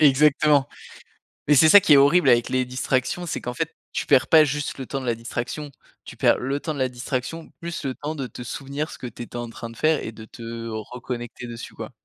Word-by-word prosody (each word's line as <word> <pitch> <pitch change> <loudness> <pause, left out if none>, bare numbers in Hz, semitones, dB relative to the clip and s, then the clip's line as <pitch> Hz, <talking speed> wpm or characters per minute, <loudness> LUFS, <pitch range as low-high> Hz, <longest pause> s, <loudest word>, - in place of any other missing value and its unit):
Exactement, 145 0 +4 0.8
mais 150 - +5
c'est 150 +3 +7
ça 205 +4 +9
qui 155 - +5
est - - +8
horrible 140 +2 +5
avec 120 -1 +4
les 130 0 +1
distractions, 130 +6 -1
c'est 165 - -3
qu'en 125 - -4
fait, 165 +5 -3 0.2
tu - - -3
perds 130 - +4
pas 155 -1 +7
juste 145 0 -3
le 135 - -5
temps 135 +2 -4
de - - -7
la 120 -2 +1
distraction, 120 +5 -5 0.3
tu - - -10
perds - - +3
le 135 +3 -2
temps 155 - -3
de 145 - -6
la 130 - +2
distraction 130 +6 -5
plus 170 -1 -5
le 135 -2 -2
temps 150 +2 -5
de 135 -4 -4
te 125 - -9
souvenir 140 +5 -4
ce - - -9
que 125 - -6
tu 120 +1 -8
étais 120 - -12
en 120 -1 -4
train 115 0 -8
de 115 - -12
faire 155 +5 +2
et - - -5
de 110 - -11
te 115 0 -8
reconnecter 120 +2 -6
dessus, 115 -1 -8
quoi. - - -8
130 Hz, 245 wpm, -24 LUFS, 120-150 Hz, 0.8 s, ça